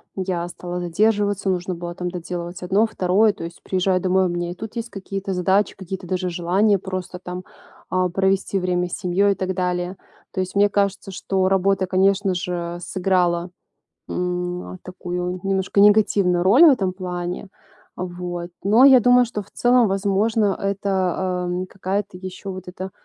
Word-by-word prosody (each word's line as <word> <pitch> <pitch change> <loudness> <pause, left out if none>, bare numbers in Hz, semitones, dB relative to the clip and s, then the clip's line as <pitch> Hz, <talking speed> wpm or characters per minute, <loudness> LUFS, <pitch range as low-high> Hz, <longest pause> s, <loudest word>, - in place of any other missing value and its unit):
Я 180 -2 -2
стала 175 0 -6
задерживаться, 205 +2 +1
нужно 180 0 -1
было 175 0 -6
там 180 0 -4
доделывать 175 +1 -6
одно, 195 +5 +3
второе. 205 +1 +2
То - - -9
есть, 170 +1 -8
приезжаю 185 0 +1
домой, 185 +1 +2
у - - +2
меня 175 0 -3
и - - -4
тут 220 +4 -8
есть 230 +1 -4
какие-то 195 -1 -5
задачи, 190 +2 +1
какие-то 190 -1 -7
даже 185 0 -1
желания 185 +4 +2
просто 185 -1 -5
там, 180 0 -7 0.5
а, 185 0 +1
провести 195 +1 +1
время 180 -1 0
с - - -9
семьей 200 +2 +2
и - - -10
так 190 0 -2
далее. 180 0 -2 0.3
То 190 - -4
есть, 185 +1 -3
мне 205 +1 +4
кажется, 200 -1 -1
что 190 0 0
работа, 195 0 +2
конечно 190 +1 +2
же, 175 -1 -3
сыграла, 180 -1 0 0.6
м, 180 0 -2
а, 185 - -9
такую 180 0 -4
немножко 195 0 0
негативную 200 -4 +4
роль 235 - +6
в 315 - +9
этом 195 -8 +1
плане. 180 0 -5 0.5
Вот, 175 -1 -5 0.2
но 225 +6 +6
я 260 -2 +8
думаю, 245 +1 +5
что 215 -3 -4
в 195 - -21
целом 245 -1 +3
возможно 200 +1 +1
это, 190 -2 -1
эм, 180 +1 -2
какая-то 195 +1 -3
ещё 185 +1 -7
вот 185 0 -8
эта 185 +1 -6
185 Hz, 170 wpm, -22 LUFS, 180-200 Hz, 0.6 s, в